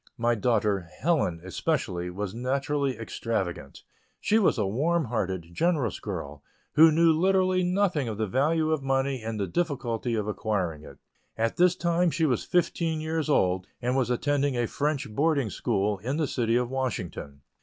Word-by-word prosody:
My 120 +1 +2
daughter 105 -6 0
Helen, 140 - +1
especially, 95 - -2
was 95 +2 -4
naturally 135 +3 -1
extravagant. 110 -5 -4 0.4
She 220 - +2
was 195 - +3
a 105 - +1
warm 155 - +1
hearted, 95 -7 -3
generous 145 - 0
girl, 70 0 -6 0.3
who 160 +1 +7
knew 165 +1 +4
literally 185 +2 +2
nothing 180 -6 +1
of 110 -2 -4
the 110 - 0
value 155 - +1
of 155 -3 0
money 135 -1 0
and 110 -1 -4
the 100 - 0
difficulty 120 - -2
of 105 -1 -2
acquiring 95 -7 -2
it. 70 -3 -12 0.4
At 115 0 0
this 180 0 +4
time 170 +1 +1
she 160 0 0
was 125 -6 +1
fifteen 170 -2 0
years 155 0 -2
old, 90 -9 +2
and 125 +1 -1
was 130 -3 +1
attending 140 +1 0
a 120 - +1
French 145 +3 -1
boarding 140 0 +1
school 100 0 0
in 130 +9 -2
the 160 - +1
City 115 -4 0
of 125 0 +2
Washington. 90 - -4
130 Hz, 165 wpm, -27 LUFS, 105-155 Hz, 0.4 s, who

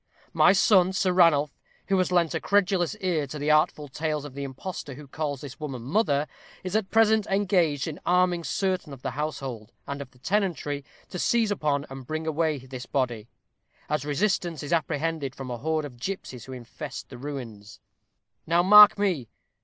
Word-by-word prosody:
My - - +6
son, 190 -1 +4
Sir 185 -1 +1
Ranulph, 150 -5 +4 0.3
who 195 - +3
has 185 - +1
lent 175 -2 +2
a 160 - -1
credulous 195 -2 +1
ear 165 -6 0
to 150 - -7
the 150 +1 0
artful 155 -1 +2
tales 150 +1 -3
of 145 - -9
the 140 +1 -5
impostor 140 +1 -6
who 145 +1 -11
calls 145 -1 -4
this 140 -3 -9
woman 135 -6 -5
mother, 145 - +1 0.4
is 185 +2 -4
at 215 -3 0
present 220 -1 +3
engaged 180 -8 +1
in 155 - -6
arming 180 -1 +2
certain 185 -6 -1
of 130 - -12
the 135 - -2
household, 135 -6 -5
and 140 0 -5
of 135 - -8
the 130 - -24
tenantry, 160 -3 -1 0.3
to 180 - -5
seize 230 0 +2
upon 150 -6 0
and 135 -2 -10
bring 155 0 -3
away 160 -1 0
this 130 -1 -9
body, 120 -5 -2 0.6
as 150 -2 0
resistance 170 +1 -1
is 145 - -3
apprehended 160 -3 -1
from 130 -2 -7
a 120 - -3
horde 155 +2 -1
of 125 -4 -11
gipsies 130 - -5
who 130 - -10
infest 130 +3 -8
the 125 - -9
ruins. 120 -7 -8 0.7
Now, 170 +2 +3
mark 210 +2 +9
me. 180 - -1
150 Hz, 185 wpm, -26 LUFS, 135-180 Hz, 0.7 s, mark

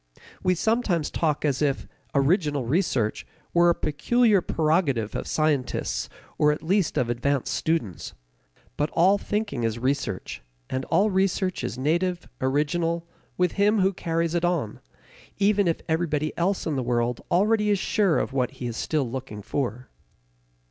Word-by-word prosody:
We 185 - +2
sometimes 200 -6 0
talk 155 -2 0
as 140 -2 0
if 140 -2 0 0.3
"original 145 - +2
research" 130 - 0 0.3
were 175 0 +5
a 170 - +3
peculiar 215 +7 +2
prerogative 155 - +1
of - - -4
scientists 155 -4 0 0.3
or 150 0 +5
at 150 +1 -4
least 185 -1 +1
of 125 -4 +2
advanced 125 +3 0
students. 140 - -2 0.6
But 150 +1 0
all 190 +4 +4
thinking 210 - -2
is 115 0 0
research, 130 -5 -2 0.3
and 130 0 -2
all 210 +2 +2
research 190 -3 0
is 120 0 -3
native, 170 +6 0
original, 165 +5 0 0.3
with 180 -2 +2
him 210 0 +4
who 190 +1 +3
carries 165 -1 -1
it 170 0 0
on, 170 -12 -1 0.6
even 200 -1 +3
if 165 - 0
everybody 155 -2 0
else 185 +3 0
in 155 - -1
the - - 0
world 120 -1 0
already 210 +4 +3
is 205 - +3
sure 190 -2 +2
of - - -1
what 125 -2 +1
he 125 - -5
is 120 -2 -3
still 150 -5 0
looking 120 -4 -6
for. 125 0 -3
155 Hz, 155 wpm, -25 LUFS, 130-185 Hz, 0.6 s, were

